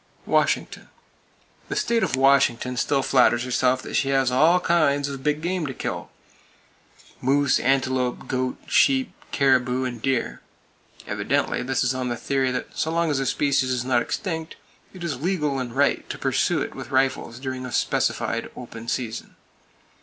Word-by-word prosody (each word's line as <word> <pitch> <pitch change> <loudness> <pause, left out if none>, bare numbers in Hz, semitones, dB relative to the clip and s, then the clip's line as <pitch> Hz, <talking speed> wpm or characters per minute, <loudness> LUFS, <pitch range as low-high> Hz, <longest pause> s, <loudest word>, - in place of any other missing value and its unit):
Washington: - - 0 0.8
The - - -2
state 235 -1 +1
of 130 - 0
Washington 130 -2 +3
still 135 +2 +1
flatters 125 -3 +3
herself 130 +1 +1
that - - -8
she 135 - +1
has 135 -2 +2
all 160 +8 +4
kinds 150 -5 +2
of 140 -1 -6
big 150 +2 -1
game 175 -2 -1
to 130 - -5
kill,—moose, 140 +1 -4
antelope, 130 -1 0
goat, 130 -1 -2
sheep, 265 -2 +3 0.2
caribou 130 -2 +2
and 120 -3 -4
deer. 135 -2 -1 0.6
Evidently - - -1
this 130 +1 0
is 130 0 +1
on 130 -1 -2
the 120 - -2
theory 135 +2 0
that 125 - -4
so 160 - -1
long 165 -1 +1
as 140 - 0
a 135 - -1
species 135 -1 +1
is 125 -1 -1
not 125 -2 +2
extinct, 160 - -4 0.4
it 185 -2 -10
is 140 -7 -3
"legal" 150 -6 0
and 125 -1 -5
right 140 +1 +1
to - - -4
pursue - - +1
it - - -6
with - - -8
rifles 130 -3 0
during 130 -1 -5
a 125 - -6
specified 115 -1 0
"open 115 -2 -9
season." 115 -2 -4
130 Hz, 160 wpm, -24 LUFS, 125-145 Hz, 0.8 s, all